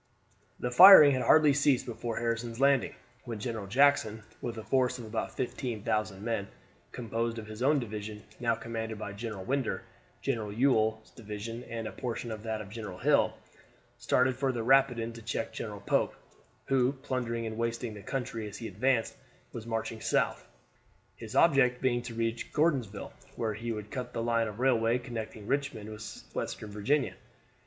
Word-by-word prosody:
The 125 - -2
firing 175 -1 +11
had 130 -1 +1
hardly 155 0 +6
ceased 140 -2 +3
before 120 -1 -4
Harrison's 115 0 -2
Landing, 140 -1 +3 0.3
when 115 -2 -5
General 110 -2 -4
Jackson, 115 -3 +3 0.2
with 120 -1 -4
a 110 - -6
force 125 0 +1
of 120 - -8
about 110 0 -4
15,000 110 -6 -2
men, 110 -3 -2 0.4
composed 115 -1 -2
of 110 - -6
his 110 +1 -9
own 145 +3 +4
division, 105 -4 -5 0.2
now 115 -1 +1
commanded 115 -1 -5
by 105 -2 -6
General 105 -2 -6
Winder, 135 -2 -1 0.4
General 115 -6 -1
Ewell's 110 -2 +1
division, 115 +1 -7
and 115 -1 -5
a - - -5
portion 120 -2 -4
of 110 -1 -5
that 110 -1 -3
of 100 -2 -10
General 105 -5 -6
Hill, - - +2 0.6
started 130 0 +2
for 135 0 0
the 120 -3 -3
Rapidan 125 -2 +3
to 115 - -10
check 115 0 -3
General 105 -3 -6
Pope, - - +1 0.5
who, 130 -1 +2
plundering 125 -4 -3
and 110 -1 -4
wasting 115 0 -2
the 105 - -9
country 115 -2 -4
as 105 - -9
he 115 - -6
advanced, 115 +4 0 0.4
was 115 0 -7
marching 115 -1 -3
south, - - 0 0.7
his 110 -1 -9
object 135 -6 +4
being 120 -2 +1
to 120 -1 -8
reach 115 0 -2
Gordonsville, 135 -11 0 0.2
where 110 -2 -1
he 115 +3 -4
would 105 -1 -6
cut 125 -1 -5
the 115 - -2
line 115 -1 +1
of 105 +1 -7
railway 120 -2 +3
connecting 115 -4 -6
Richmond 130 -5 -2
with 110 - -8
Western 105 - -4
Virginia. 130 +8 +1
115 Hz, 170 wpm, -30 LUFS, 110-125 Hz, 0.7 s, firing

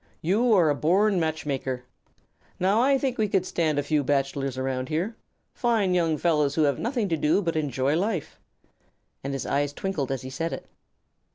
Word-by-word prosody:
You 215 +9 +2
are 170 -7 +5
a - - +3
born 190 +7 +2
matchmaker. 145 -5 -2 0.8
Now 195 +5 +3
I 270 +2 +4
think 260 -2 -2
we 215 - +2
could 190 -2 +1
stand 160 -5 0
a 145 - +1
few 150 0 +1
bachelors 135 -1 -1
around 130 0 -2
here, 175 +9 -1 0.4
fine 225 -6 +1
young 165 -3 +2
fellows 150 -3 +1
who 160 - +3
have 140 -3 +1
nothing 235 -3 -1
to 165 - +1
do 150 +4 +2
but 170 -5 -2
enjoy 140 -2 0
life." 185 -2 -2 0.8
And 140 - -3
his 135 - -3
eyes 145 +1 0
twinkled 150 -7 -3
as 135 -2 -3
he 130 - -7
said 165 +5 -3
it. - - -6
160 Hz, 185 wpm, -26 LUFS, 140-195 Hz, 0.8 s, are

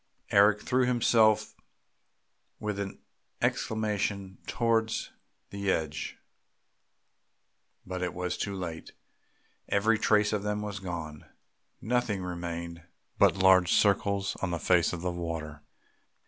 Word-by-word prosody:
Eric 105 +1 +5
threw 125 0 +2
himself 115 -3 +3 1.1
with 105 -2 -3
an 100 -1 -4 0.4
exclamation 105 -3 -1
towards 115 -2 0 0.4
the 100 0 -3
edge, 80 -3 -3 1.7
but 95 0 -5
it 90 -1 -2
was 90 0 -2
too 100 -1 -3
late! 85 -4 -6 0.8
Every 110 +2 +2
trace 105 -1 +3
of 105 - 0
them 105 0 -2
was 105 -1 -5
gone, 85 -5 -6 0.6
nothing 110 -5 0
remained 85 -1 -5 0.4
but - - +5
large 95 -2 +5
circles 100 -1 +2
on 95 - -1
the 85 - -1
face 85 0 +3
of 90 - -5
the 90 0 -1
water. 80 -3 -5
100 Hz, 115 wpm, -29 LUFS, 85-105 Hz, 1.7 s, Eric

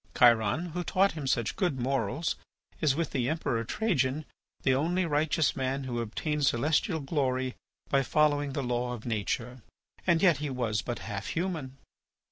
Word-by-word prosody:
Chiron, 120 - +4
who 175 +2 -3
taught 195 +3 +3
him 150 -4 -5
such 120 -4 0
good 175 -9 0
morals, 135 +4 0 0.4
is, 150 -4 +3
with 165 0 -1
the 125 -2 0
Emperor 150 -7 -1
Trajan, 145 - 0 0.4
the 135 - +4
only 170 +7 +1
righteous 155 -1 +1
man 135 +1 -1
who 120 -2 -3
obtained 145 +6 -1
celestial 155 - +1
glory 130 -3 0 0.3
by 140 - +3
following 145 0 +2
the 140 - -2
law 125 0 -1
of 115 -3 -8
nature. 120 +2 -2 0.5
And 170 -2 +5
yet 170 -6 +6
he 150 -1 -3
was 115 -5 -1
but 120 +1 -4
half 105 -1 -4
human. 160 -7 -3
135 Hz, 160 wpm, -29 LUFS, 125-155 Hz, 0.5 s, yet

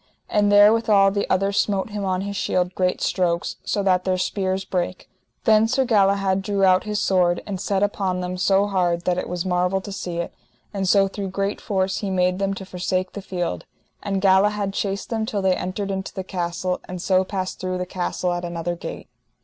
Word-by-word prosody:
And 205 -1 +3
therewithal 205 -1 +6
the 200 0 -2
other 195 +1 +2
smote 200 0 0
him 205 -1 -3
on 185 -1 0
his 200 +1 -4
shield 180 -1 0
great 185 -1 0
strokes, 175 -2 0
so 200 - -1
that 185 -2 +2
their 185 -1 0
spears 190 0 -1
brake. 180 0 -3 0.4
Then 220 0 +5
Sir 260 +3 +1
Galahad 195 -4 +2
drew 200 0 -1
out 185 +1 +4
his 210 -1 -1
sword, 180 -3 +2
and 195 -3 -4
set 200 -1 0
upon 195 -3 0
them 180 0 -3
so 195 +2 +3
hard 175 -4 0
that 180 0 +1
it - - -5
was 175 0 -3
marvel 180 +1 +1
to 200 - -8
see 180 -3 -5
it, 170 - -3 0.4
and 195 -2 -1
so 195 -1 +5
through 195 0 -5
great 195 +2 -2
force 190 -2 -1
he 200 - -3
made 180 0 +1
them 195 0 0
to 195 - -7
forsake 185 0 -2
the 200 - -7
field; 175 - -4 0.3
and 195 -2 -2
Galahad 200 +1 +3
chased 200 +2 -3
them 225 -1 0
till 200 -3 -2
they 190 -1 +3
entered 195 +3 -3
into 190 0 -4
the 190 - -3
castle, 180 0 -3
and 180 0 -5
so 185 +1 +2
passed 190 -1 -4
through 185 0 -2
the 180 - -2
castle 180 0 -2
at 175 0 -3
another 175 0 -3
gate. 170 - -7
190 Hz, 205 wpm, -23 LUFS, 180-200 Hz, 0.4 s, therewithal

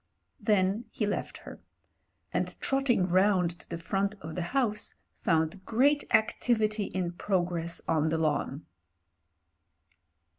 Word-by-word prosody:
Then 205 +1 +2
he 215 - -2
left 205 - -3
her - - -11 0.4
— - - -39
and - - -2
trotting 270 -8 +2
round 185 -1 +3
to - - -16
the 170 - -3
front 195 +4 -1
of 160 -1 -7
the 180 - -3
house, 215 +2 0 0.2
found 165 +3 0
great 280 +8 +3
activity 215 -1 +2
in 180 -3 -2
progress 175 -2 -1
on 160 -1 +2
the 160 - 0
lawn. 150 -2 -1
190 Hz, 125 wpm, -29 LUFS, 170-215 Hz, 0.4 s, round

